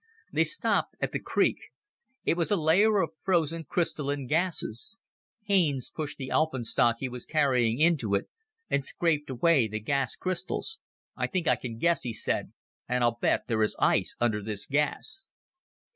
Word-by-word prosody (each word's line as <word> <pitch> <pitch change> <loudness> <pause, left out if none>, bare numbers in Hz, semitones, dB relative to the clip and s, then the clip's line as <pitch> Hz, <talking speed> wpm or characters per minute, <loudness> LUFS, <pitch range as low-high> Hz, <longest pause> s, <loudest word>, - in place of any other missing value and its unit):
They - - +3
stopped - - 0
at - - -1
the - - -2
creek. - - +1 0.7
It - - +3
was 170 -1 0
a 205 - +3
layer 195 +5 +4
of 160 0 -5
frozen 165 -2 0
crystalline 145 -5 -1
gases. 165 - +1 0.5
Haines 170 - +1
pushed 155 -2 -5
the 130 -2 -6
alpenstock 120 -6 +2
he 130 - -3
was 125 -1 -8
carrying 125 -7 +2
into 150 -11 +3
it 100 - -1 0.4
and 140 - 0
scraped 150 +1 0
away 130 -1 +3
the 110 0 -4
gas 135 +4 -1
crystals. 185 - -2 0.4
"I - - -1
think 180 -4 -2
I 125 - +5
can 115 -1 -7
guess," 170 +7 +2
he 120 -3 -4
said, - - -2 0.4
"and 125 0 +1
I'll 120 -1 +1
bet - - +1
there 110 -2 0
is 105 - +1
ice - - +2
under 110 -3 +1
this 100 -1 -5
gas." 150 - 0
145 Hz, 165 wpm, -28 LUFS, 120-170 Hz, 0.7 s, I